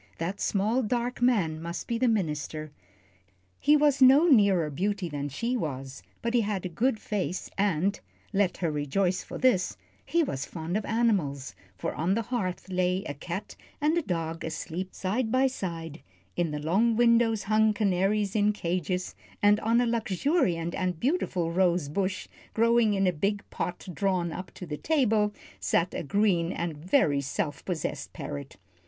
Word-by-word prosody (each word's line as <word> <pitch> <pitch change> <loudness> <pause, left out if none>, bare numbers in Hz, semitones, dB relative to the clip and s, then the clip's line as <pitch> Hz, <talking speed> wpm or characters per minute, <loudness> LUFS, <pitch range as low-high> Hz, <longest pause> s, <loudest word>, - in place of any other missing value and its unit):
That 180 +5 -3
small, 215 +6 +1
dark 240 +2 -2
man 185 -11 +2
must 170 +1 -5
be 230 -1 -1
the 255 - +3
minister. 155 -7 -1 0.9
He 300 +1 +5
was 290 -2 +3
no 270 +5 +8
nearer 200 - +4
beauty 195 +4 -1
than 145 -1 -3
she 235 - -2
was, 135 - -4 0.2
but 235 0 -1
he 240 - +4
had 200 -3 -2
a - - -2
good 225 +6 0
face, 185 -4 -3
and 195 -1 +1 0.3
let 195 -2 +1
her 170 -3 -1
rejoice 175 +6 0
for - - -8
this 245 -8 +2 0.3
he 340 0 +1
was 135 - -3
fond 165 +1 -4
of 215 - -1
animals, 195 - 0 0.2
for - - -3
on 175 +5 0
the 230 - 0
hearth 200 -7 -3
lay 185 0 0
a 145 - -4
cat 175 +7 -6 0.2
and 305 +2 +2
a 340 - +2
dog 165 - -3
asleep 165 +4 -5
side 220 +5 -1
by 260 +2 +4
side, 170 - -4 0.3
in 175 -2 0
the 150 - -3
long 195 +10 +2
windows 235 -2 +3
hung 215 +1 +3
canaries 200 0 +1
in 210 0 +3
cages, 180 -1 -2 0.3
and 205 +1 +4
on 230 +2 +2
a 245 - +3
luxuriant 215 - 0
and 180 -3 -2
beautiful 200 - 0
rose 175 -4 +2
bush, 190 +4 -2 0.3
growing 230 -2 +4
in 195 0 +2
a 180 - +2
big 200 +6 -1
pot 180 +1 -4
drawn 185 -2 0
up 185 +2 -6
to 180 - -7
the 150 -3 -5
table, 225 - +2 0.3
sat 95 - +1
a - - -2
green 175 0 +1
and 170 -2 -3
very 150 - +2
self 145 +1 -3
possessed 175 -5 -3
parrot. 140 -2 -7
190 Hz, 170 wpm, -28 LUFS, 165-225 Hz, 0.9 s, no